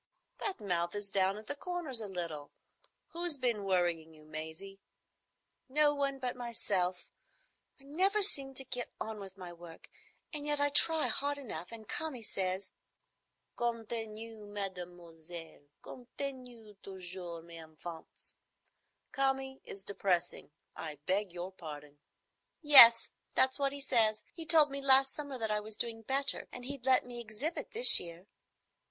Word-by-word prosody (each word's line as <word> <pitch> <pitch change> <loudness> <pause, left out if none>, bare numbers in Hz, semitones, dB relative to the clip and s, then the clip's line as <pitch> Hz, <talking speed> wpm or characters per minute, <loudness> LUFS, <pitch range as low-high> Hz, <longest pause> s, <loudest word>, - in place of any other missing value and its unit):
"That 400 -3 -4
mouth 175 -4 -3
is 205 -1 -5
down 190 +1 0
at 215 - -11
the 285 - -4
corners 315 -7 -2
a 215 - -6
little. 170 -6 -7 0.6
Who's 340 -3 -2
been 240 -5 -2
worrying 175 -4 -2
you, 155 0 -19
Maisie?" 160 +6 -9 0.9
"No 295 +2 +2
one 280 -1 -3
but 255 -2 -4
myself. 200 -7 -2 0.7
I - - -13
never 380 +9 0
seem 275 -8 0
to 270 - +1
get 245 -1 -5
on 220 -1 -6
with 195 -1 -11
my 180 -2 -10
work, 170 -1 -14 0.4
and 295 -1 -6
yet 295 0 -2
I 285 0 +2
try 320 +2 +4
hard 285 +1 -2
enough, 195 - -9
and 220 -2 -12
Kami 290 -7 -3
says——" 190 -1 -4 0.8
"'Continuez, 225 -2 -6
mesdemoiselles. 175 -5 -9
Continuez 245 -5 -10
toujours, 180 -3 -9
mes 170 -1 -12
enfants.' 160 +1 -13 0.8
Kami 270 0 -2
is 195 - -11
depressing. 180 -5 -3 0.3
I 155 -2 -8
beg 195 +1 -2
your 180 +2 -7
pardon." 150 -5 -12 0.6
"Yes, 235 -6 +11 0.3
that's 260 +2 +1
what 275 -1 0
he 280 - -6
says. 225 -5 +2
He 325 -1 -11
told 305 -3 +7
me 275 0 -6
last 270 0 +6
summer 285 -3 -7
that 220 -2 -3
I 210 - 0
was 210 0 -9
doing 225 0 -5
better 275 +5 -1
and 245 0 -10
he'd 270 -1 -8
let 260 -1 +3
me 240 -1 -9
exhibit 235 +9 -4
this 470 +3 +9
year." 170 +1 -10
220 Hz, 145 wpm, -31 LUFS, 180-270 Hz, 0.9 s, Yes